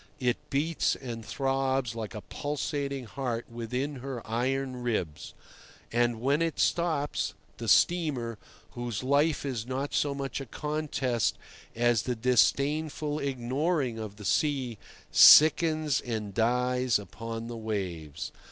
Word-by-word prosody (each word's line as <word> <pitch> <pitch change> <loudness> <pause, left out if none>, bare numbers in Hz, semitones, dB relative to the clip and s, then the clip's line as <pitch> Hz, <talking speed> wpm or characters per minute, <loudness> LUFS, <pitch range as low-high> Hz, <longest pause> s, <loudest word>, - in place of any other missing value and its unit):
It 125 -2 -1
beats 155 +4 +1
and 115 -3 -7
throbs 135 -2 0
like 110 -2 -6
a 105 - -5
pulsating 140 -1 -3
heart 120 0 -3
within 125 +5 -3
her 130 -2 -6
iron 130 +2 -1
ribs, 95 -11 -3 0.6
and 120 -1 +1
when 140 +6 +1
it 165 -1 -1
stops, 160 -4 0 0.2
the 115 - -6
steamer, 135 - +2 0.3
whose 120 -3 -4
life 145 +3 +2
is 120 -4 -3
not 135 +2 -3
so 145 -1 +1
much 140 0 -4
a 135 - -7
contest 145 -5 -1 0.4
as 120 -1 +3
the 125 - -2
disdainful 145 +5 +1
ignoring 135 0 -1
of 105 -2 -6
the 105 -1 -10
sea, 130 -7 0 0.3
sickens 155 -2 +7
and 110 -4 -4
dies 125 +2 +2
upon 115 +3 -6
the 120 0 -6
waves. 95 -9 -4
125 Hz, 125 wpm, -29 LUFS, 115-140 Hz, 0.6 s, sickens